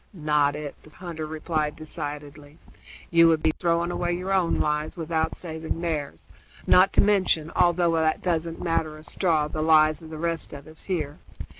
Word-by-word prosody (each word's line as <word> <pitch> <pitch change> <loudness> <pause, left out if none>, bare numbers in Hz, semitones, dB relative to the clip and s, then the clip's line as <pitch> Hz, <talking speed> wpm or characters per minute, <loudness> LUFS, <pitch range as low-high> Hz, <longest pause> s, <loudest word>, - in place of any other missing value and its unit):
"Not 150 -4 +1
it," 150 -1 -6
the - - -16
hunter 165 -4 -6
replied 155 -1 -2
decidedly. 145 -1 -7 0.5
"You 165 0 +6
would 160 -1 +2
be 160 - +4
throwing 170 0 +1
away 175 0 -1
your 185 +2 -2
own 185 -3 +2
lives 150 +2 -1
without 160 -1 -1
saving 160 -1 -5
theirs, 155 -5 -4 0.4
not 185 +2 +5
to - - +5
mention, 185 -6 +2
although 175 -1 +3
that 160 -1 +1
doesn't 165 -2 -1
matter 160 -2 -1
a 155 - -13
straw, 160 -2 0
the 155 +1 -4
lives 155 0 +4
of 160 - -11
the 160 - -7
rest 165 0 -3
of 140 -1 -9
us 155 0 -11
here. 155 -6 -3
160 Hz, 175 wpm, -25 LUFS, 155-170 Hz, 0.5 s, You